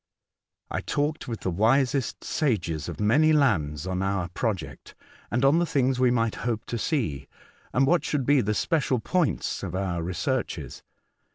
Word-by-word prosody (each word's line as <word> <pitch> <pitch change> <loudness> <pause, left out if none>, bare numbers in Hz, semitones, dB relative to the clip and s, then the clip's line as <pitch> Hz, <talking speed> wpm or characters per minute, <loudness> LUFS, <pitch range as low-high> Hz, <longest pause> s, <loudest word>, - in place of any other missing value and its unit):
I - - -1
talked 145 +1 -2
with 115 -3 -5
the 95 - -1
wisest 125 +7 +1
sages 85 - -1
of - - -7
many 145 +10 +4
lands 85 - +1
on 95 0 -2
our 95 -3 -1
project, 95 -2 -4 0.3
and 125 +4 +1
on 145 +5 +5
the 175 - +2
things 130 -3 +1
we 125 -1 +4
might 115 -2 +1
hope 115 -2 -2
to 120 - -2
see, 80 - -1 0.4
and 130 +3 +3
what 170 +1 +3
should 145 -5 -1
be 145 0 +4
the 105 -1 -1
special 145 -3 +1
points 165 +7 -1
of 95 -2 -5
our 95 -3 -1
researches. 95 - -3
120 Hz, 165 wpm, -26 LUFS, 95-140 Hz, 0.4 s, on